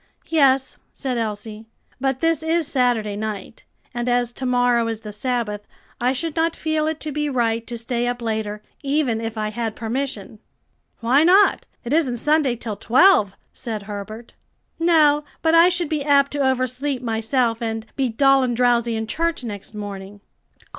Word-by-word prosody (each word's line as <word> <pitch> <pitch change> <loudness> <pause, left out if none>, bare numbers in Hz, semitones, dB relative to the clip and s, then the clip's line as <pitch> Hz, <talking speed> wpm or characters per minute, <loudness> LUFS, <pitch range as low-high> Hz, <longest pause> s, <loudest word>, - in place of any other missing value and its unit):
"Yes," 270 -4 +2 0.2
said 255 -3 -2
Elsie, 215 0 -5 0.3
"but 265 -1 -1
this 330 -2 +2
is 325 +1 +1
Saturday 245 -7 0
night, 210 0 -6 0.3
and 240 +1 -2
as 245 -1 +1
to 255 +1 -4
morrow 245 -2 +2
is 225 -1 -4
the 210 - -7
Sabbath, 210 -2 -3 0.3
I 245 +1 +2
should 300 +4 -3
not 330 0 +1
feel 315 -1 -1
it 315 0 -2
to 305 - -3
be 295 +1 -1
right 230 -3 0
to 240 - -4
stay 235 +1 -2
up 245 0 -2
later, 215 -2 -3 0.2
even 275 -5 0
if 225 0 -5
I 215 0 -1
had 225 0 -3
permission." 225 -3 -4 0.6
"Why 255 +6 +4
not? 380 +5 +4 0.2
it 240 +3 -3
isn't 280 -7 +1
Sunday 295 -1 +2
till 225 -3 -6
twelve," 235 - +4 0.2
said 220 -3 -5
Herbert. 210 +3 -8 0.5
"No, 310 -3 +4 0.2
but 325 0 +3
I 335 +2 +7
should 350 -2 -1
be 300 -2 -2
apt 280 -1 +3
to 290 - -3
oversleep 255 +1 -2
myself, 230 +1 0
and 225 -1 -3
be 265 -2 0
dull 270 +4 +4
and 250 -2 0
drowsy 240 -2 +2
in 220 0 -2
church 335 +4 -2
next 210 -1 -7
morning." 200 -1 -7
245 Hz, 170 wpm, -22 LUFS, 225-285 Hz, 0.6 s, I